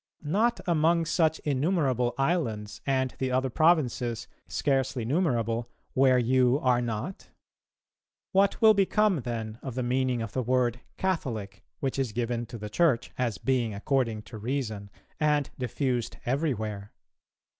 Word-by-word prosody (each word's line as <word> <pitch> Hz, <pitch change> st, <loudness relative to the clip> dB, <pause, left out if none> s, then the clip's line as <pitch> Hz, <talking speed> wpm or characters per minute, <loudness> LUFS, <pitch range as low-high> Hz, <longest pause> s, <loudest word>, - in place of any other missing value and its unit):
Not 215 Hz, +10 st, +1 dB
among 165 Hz, -1 st, +3 dB
such 160 Hz, -1 st, +2 dB
innumerable 135 Hz, -4 st, +1 dB
islands 125 Hz, -9 st, -1 dB
and 130 Hz, -1 st, +1 dB
the 130 Hz, -, 0 dB
other 130 Hz, 0 st, 0 dB
provinces, 130 Hz, -7 st, +2 dB, 0.2 s
scarcely 135 Hz, -4 st, 0 dB
numerable, 120 Hz, -, 0 dB, 0.2 s
where 130 Hz, -1 st, +5 dB
you 125 Hz, +1 st, +3 dB
are 125 Hz, -2 st, +3 dB
not? 120 Hz, -, -4 dB, 1.0 s
What 195 Hz, +1 st, +3 dB
will 220 Hz, 0 st, +9 dB
become 200 Hz, -1 st, +3 dB
then 115 Hz, -2 st, -5 dB
of 130 Hz, -4 st, -6 dB
the 130 Hz, -, -1 dB
meaning 125 Hz, -1 st, 0 dB
of 115 Hz, -, -6 dB
the 130 Hz, -, -1 dB
word 125 Hz, 0 st, +1 dB, 0.2 s
Catholic, 115 Hz, -, -2 dB, 0.2 s
which 135 Hz, 0 st, -1 dB
is 125 Hz, -5 st, -1 dB
given 120 Hz, 0 st, -2 dB
to 120 Hz, -, -8 dB
the 105 Hz, -1 st, -6 dB
Church, 120 Hz, +2 st, +1 dB
as 120 Hz, -5 st, 0 dB
being 120 Hz, -5 st, 0 dB
according 115 Hz, -1 st, 0 dB
to 110 Hz, -1 st, -10 dB
reason[263:1] 110 Hz, -4 st, -3 dB, 0.3 s
and 150 Hz, -2 st, +2 dB
diffused 125 Hz, -1 st, -2 dB
every 140 Hz, +3 st, +1 dB
where? 105 Hz, -1 st, -5 dB
130 Hz, 140 wpm, -28 LUFS, 115-150 Hz, 1.0 s, will